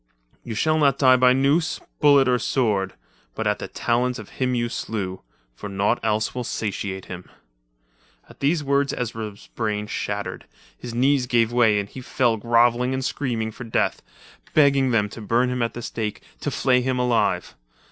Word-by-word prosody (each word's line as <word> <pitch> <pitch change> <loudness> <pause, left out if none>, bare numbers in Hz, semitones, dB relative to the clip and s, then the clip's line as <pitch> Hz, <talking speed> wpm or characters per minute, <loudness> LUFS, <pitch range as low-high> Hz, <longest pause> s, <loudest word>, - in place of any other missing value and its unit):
"You 115 - -6
shall 155 +6 +2
not 140 -3 +3
die 130 -2 +6
by 125 0 +5
noose, 145 +6 +1 0.2
bullet 140 -3 +5
or 125 -1 +3
sword, 105 -9 0 0.4
but 110 - -3
at 105 0 +1
the - - -5
talons 125 +1 0
of 110 -3 -10
him 125 -1 -1
you 120 -1 0
slew—for 95 - -6
naught 100 +1 +1
else 110 +1 0
will 125 - -3
satiate 100 -4 -4
him." 90 -1 -9 1.0
At - - -17
these 150 +3 +1
words 140 0 +1
Ezra's 110 -4 -5
brain 105 -2 -2
shattered, 105 - -4 0.3
his 115 - -8
knees 130 +1 +2
gave 120 -2 +2
way 115 -4 +4
and 100 - -3
he 130 - -9
fell 120 -2 +1
grovelling 120 +3 +2
and 130 -1 -2
screaming 115 -6 -2
for 115 - -9
death, 115 - 0 0.5
begging 140 -3 +4
them 110 -4 +2
to 115 - -9
burn 120 +4 +1
him 125 -1 -2
at 115 - -1
the 120 - -6
stake, 110 -2 -4 0.2
to - - -2
flay 125 -2 +2
him 130 0 -1
alive. 125 -2 +1
120 Hz, 175 wpm, -23 LUFS, 110-130 Hz, 1.0 s, die